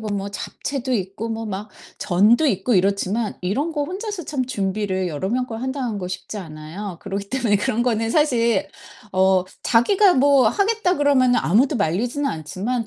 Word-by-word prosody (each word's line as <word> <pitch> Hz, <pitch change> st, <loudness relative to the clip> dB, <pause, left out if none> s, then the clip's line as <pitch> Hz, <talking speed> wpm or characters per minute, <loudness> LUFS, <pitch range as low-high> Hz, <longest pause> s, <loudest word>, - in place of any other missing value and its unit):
보면 210 Hz, -2 st, -3 dB
뭐 200 Hz, 0 st, -3 dB
잡채도 260 Hz, +5 st, -4 dB
있고 195 Hz, +2 st, -3 dB
뭐 225 Hz, 0 st, -4 dB
막 205 Hz, +1 st, -5 dB, 0.3 s
전도 210 Hz, -, +3 dB
있고 210 Hz, -1 st, +1 dB
이렇지만 200 Hz, +3 st, +1 dB
이런 250 Hz, -, -1 dB
거 295 Hz, -2 st, -1 dB
혼자서 390 Hz, +3 st, -5 dB
참 265 Hz, -4 st, -2 dB
준비를 195 Hz, -4 st, -1 dB
여러 160 Hz, +4 st, -3 dB
명 250 Hz, +4 st, 0 dB
걸 225 Hz, -2 st, -6 dB
한다는 260 Hz, -4 st, -3 dB
거 180 Hz, -2 st, -5 dB
쉽지 185 Hz, +3 st, -6 dB
않아요. 165 Hz, +2 st, -7 dB
그러기 200 Hz, +1 st, -4 dB
때문에 240 Hz, -6 st, +2 dB
그런 215 Hz, +4 st, 0 dB
거는 225 Hz, -2 st, 0 dB
사실 235 Hz, -9 st, +2 dB, 0.5 s
어 190 Hz, -1 st, +3 dB, 0.2 s
"자기가 370 Hz, -, +4 dB
뭐 275 Hz, 0 st, +5 dB
하겠다." 410 Hz, -3 st, +1 dB
그러면은 270 Hz, -4 st, +3 dB
아무도 250 Hz, -, +2 dB
말리지는 235 Hz, -, -1 dB
않지만 205 Hz, +10 st, -3 dB
225 Hz, 350 characters per minute, -22 LUFS, 195-265 Hz, 0.5 s, 뭐